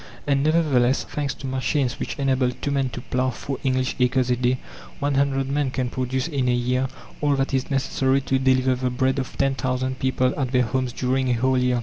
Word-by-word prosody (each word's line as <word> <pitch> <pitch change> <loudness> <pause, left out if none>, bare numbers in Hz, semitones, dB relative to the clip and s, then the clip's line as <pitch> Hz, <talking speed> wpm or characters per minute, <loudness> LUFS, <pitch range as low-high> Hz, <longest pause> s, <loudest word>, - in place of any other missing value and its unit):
And 140 -2 +2
nevertheless, 145 -5 +3
thanks 145 -3 -3
to - - -9
machines 130 0 -1
which - - -3
enable 135 -2 +2
2 135 +3 -4
men 135 -2 +1
to 120 +1 -7
plough 130 +1 0
4 130 +2 -5
English 130 -1 0
acres 125 0 +2
a - - +4
day, 125 +1 +1 0.4
100 140 -1 +1
men 140 0 0
can 125 -1 -2
produce 130 +1 -1
in 135 -6 0
a 125 - +3
year 125 +2 0 0.3
all 145 -1 +3
that 135 0 -1
is 130 0 0
necessary 135 0 +1
to 135 0 0
deliver 130 0 +3
the 125 0 -1
bread 130 +2 0
of 130 - -5
10,000 130 -1 0
people 130 -1 +1
at 130 -3 -1
their 125 -1 +4
homes 125 +2 -1
during 130 +1 0
a - - +3
whole 130 +3 +2
year. 125 -1 +2
130 Hz, 210 wpm, -23 LUFS, 125-135 Hz, 0.4 s, a